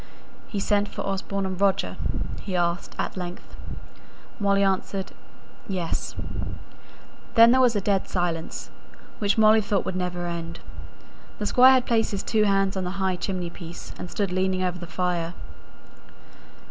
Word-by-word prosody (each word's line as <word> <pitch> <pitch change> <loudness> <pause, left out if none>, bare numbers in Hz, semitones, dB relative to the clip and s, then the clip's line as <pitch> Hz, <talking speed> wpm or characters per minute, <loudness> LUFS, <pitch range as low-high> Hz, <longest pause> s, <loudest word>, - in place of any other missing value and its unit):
"He 205 - -3
sent 205 +1 +2
for - - -5
Osborne 195 0 -2
and 190 0 -4
Roger?" 195 -1 +2 0.5
he 190 - -4
asked, 175 +1 -1
at - - -2
length. 180 -1 -7 0.8
Molly 200 -1 +3
answered, 195 0 0 0.6
"Yes." 180 -5 -3 1.2
Then 230 +1 +9
there 260 +1 +5
was 245 -3 +4
a 205 - +1
dead 195 -1 +1
silence, 175 -3 -2 0.5
which 205 0 +1
Molly 220 0 +6
thought 200 -1 0
would 185 - -2
never 180 -1 -2
end. 170 0 -4 0.8
The 210 - -3
Squire 255 +5 +7
had 255 -1 +3
placed 225 -2 +2
his 200 -2 -3
two 215 -1 +2
hands 195 -1 +2
on 190 - -1
the 180 +2 -4
high 190 -1 +1
chimney 180 -1 -3
piece, 170 0 -9
and 180 - -5
stood 200 -1 -1
leaning 185 0 +1
over 180 -1 -1
the 175 - -7
fire. 175 -1 -1
190 Hz, 155 wpm, -25 LUFS, 180-205 Hz, 1.2 s, Then